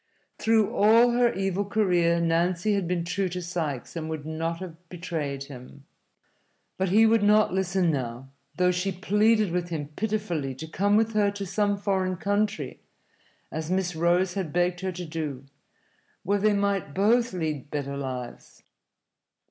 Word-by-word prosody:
Through 220 Hz, -2 st, +2 dB
all 230 Hz, +4 st, +5 dB
her 240 Hz, 0 st, +3 dB
evil 195 Hz, +1 st, -1 dB
career 180 Hz, -5 st, +2 dB
Nancy 170 Hz, +4 st, +1 dB
had 195 Hz, -4 st, 0 dB
been 175 Hz, -1 st, -1 dB
true 185 Hz, +2 st, -1 dB
to 180 Hz, +1 st, -4 dB
Sikes 165 Hz, -7 st, -4 dB
and 160 Hz, -1 st, -4 dB
would 155 Hz, -2 st, -5 dB
not 165 Hz, +1 st, -3 dB
have 175 Hz, -1 st, -10 dB
betrayed 160 Hz, -6 st, -4 dB
him. 140 Hz, 0 st, -12 dB, 0.9 s
But 190 Hz, -1 st, +1 dB
he 215 Hz, +4 st, +5 dB
would 225 Hz, 0 st, +4 dB
not 210 Hz, -2 st, +4 dB
listen 190 Hz, -2 st, +1 dB
now, 130 Hz, -2 st, -4 dB, 0.3 s
though 180 Hz, 0 st, +3 dB
she 180 Hz, +2 st, -1 dB
pleaded 210 Hz, +2 st, +2 dB
with 175 Hz, 0 st, -2 dB
him 150 Hz, -4 st, -4 dB
pitifully 175 Hz, -7 st, -2 dB
to 155 Hz, -, -7 dB
come 200 Hz, +6 st, +1 dB
with 225 Hz, 0 st, +1 dB
her 210 Hz, -1 st, +3 dB
to 200 Hz, 0 st, -5 dB
some 205 Hz, +2 st, 0 dB
foreign 190 Hz, -2 st, 0 dB
country 205 Hz, +3 st, -1 dB, 0.7 s
(as 160 Hz, 0 st, -4 dB
Miss 185 Hz, -2 st, 0 dB
Rose 175 Hz, +3 st, +2 dB
had 185 Hz, -6 st, -3 dB
begged 175 Hz, +1 st, +1 dB
her 190 Hz, 0 st, -2 dB
to 180 Hz, 0 st, -6 dB
do), 155 Hz, -5 st, -5 dB, 0.8 s
where 200 Hz, +2 st, +1 dB
they 210 Hz, +1 st, +3 dB
might 200 Hz, -7 st, -1 dB
both 230 Hz, +4 st, +3 dB
lead 155 Hz, -6 st, -3 dB
better 140 Hz, -2 st, -3 dB
lives. 130 Hz, -3 st, -7 dB
180 Hz, 160 wpm, -26 LUFS, 160-200 Hz, 0.9 s, all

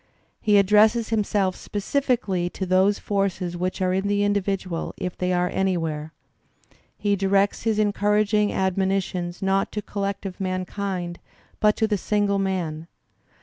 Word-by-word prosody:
He 210 Hz, -2 st, +4 dB
addresses 215 Hz, +3 st, +4 dB
himself 205 Hz, -4 st, +1 dB
specifically 205 Hz, -5 st, -1 dB
to 190 Hz, -, -4 dB
those 190 Hz, +2 st, +3 dB
forces 195 Hz, -3 st, -1 dB
which 185 Hz, +2 st, -2 dB
are 185 Hz, 0 st, +1 dB
in 190 Hz, +2 st, 0 dB
the 205 Hz, 0 st, +1 dB
individual 195 Hz, -4 st, -1 dB
if 180 Hz, -1 st, -4 dB
they 180 Hz, 0 st, -1 dB
are 180 Hz, 0 st, +1 dB
anywhere. 165 Hz, -5 st, -1 dB, 0.9 s
He 205 Hz, -1 st, +1 dB
directs 195 Hz, +2 st, +1 dB
his 220 Hz, -2 st, +1 dB
encouraging 210 Hz, 0 st, +2 dB
admonitions 190 Hz, -2 st, -1 dB
not 195 Hz, 0 st, +1 dB
to 210 Hz, -, -2 dB
collective 200 Hz, -1 st, -4 dB
mankind 185 Hz, -1 st, -3 dB, 0.4 s
but 210 Hz, 0 st, +4 dB
to 220 Hz, -, +2 dB
the 210 Hz, -2 st, 0 dB
single 205 Hz, 0 st, +1 dB
man. 170 Hz, -5 st, -2 dB
195 Hz, 135 wpm, -24 LUFS, 185-205 Hz, 0.9 s, He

